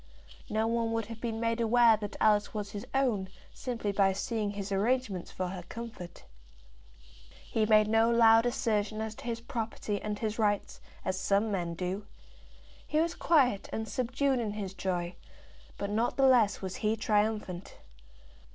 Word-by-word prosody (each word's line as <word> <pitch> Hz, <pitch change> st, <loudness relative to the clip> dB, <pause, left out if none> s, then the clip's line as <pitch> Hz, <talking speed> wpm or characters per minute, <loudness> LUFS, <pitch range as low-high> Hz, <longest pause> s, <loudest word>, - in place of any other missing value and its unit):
No 220 Hz, +1 st, +1 dB
one 230 Hz, 0 st, 0 dB
would 225 Hz, -1 st, -1 dB
have 230 Hz, +1 st, -9 dB
been 225 Hz, -2 st, -3 dB
made 230 Hz, 0 st, 0 dB
aware 230 Hz, 0 st, +5 dB
that 205 Hz, -1 st, -6 dB
Alice 210 Hz, 0 st, +3 dB
was 205 Hz, -1 st, -3 dB
his 205 Hz, -1 st, -7 dB
own 235 Hz, -9 st, +1 dB, 0.2 s
simply 230 Hz, -5 st, -3 dB
by 195 Hz, -1 st, +3 dB
seeing 215 Hz, +1 st, -2 dB
his 200 Hz, 0 st, -5 dB
arrangements 205 Hz, -2 st, 0 dB
for 185 Hz, -1 st, -3 dB
her 185 Hz, 0 st, -6 dB
comfort. 220 Hz, -7 st, -8 dB, 1.2 s
He 220 Hz, -1 st, 0 dB
made 215 Hz, -1 st, +5 dB
no 225 Hz, +1 st, +4 dB
loud 230 Hz, 0 st, +6 dB
assertion 215 Hz, -4 st, 0 dB
as 220 Hz, -1 st, -3 dB
to 220 Hz, -, -12 dB
his 230 Hz, -1 st, -3 dB
property 225 Hz, -3 st, -3 dB
and 210 Hz, -1 st, -3 dB
his 215 Hz, 0 st, -3 dB
rights, 205 Hz, -2 st, 0 dB, 0.2 s
as 185 Hz, 0 st, -1 dB
some 205 Hz, +3 st, +1 dB
men 175 Hz, -4 st, -2 dB
do. 185 Hz, +4 st, -4 dB, 0.8 s
He 305 Hz, -, +1 dB
was 335 Hz, +1 st, +1 dB
quiet 260 Hz, -11 st, +2 dB
and 220 Hz, 0 st, -3 dB
subdued 255 Hz, +4 st, 0 dB
in 215 Hz, -3 st, -2 dB
his 200 Hz, -3 st, -5 dB
joy, 180 Hz, -2 st, -2 dB, 0.6 s
but 200 Hz, 0 st, -3 dB
not 225 Hz, +3 st, 0 dB
the 270 Hz, -, +4 dB
less 235 Hz, -7 st, +4 dB
was 190 Hz, -1 st, -4 dB
he 220 Hz, -3 st, +1 dB
triumphant. 210 Hz, -4 st, -1 dB
215 Hz, 165 wpm, -30 LUFS, 200-230 Hz, 1.2 s, loud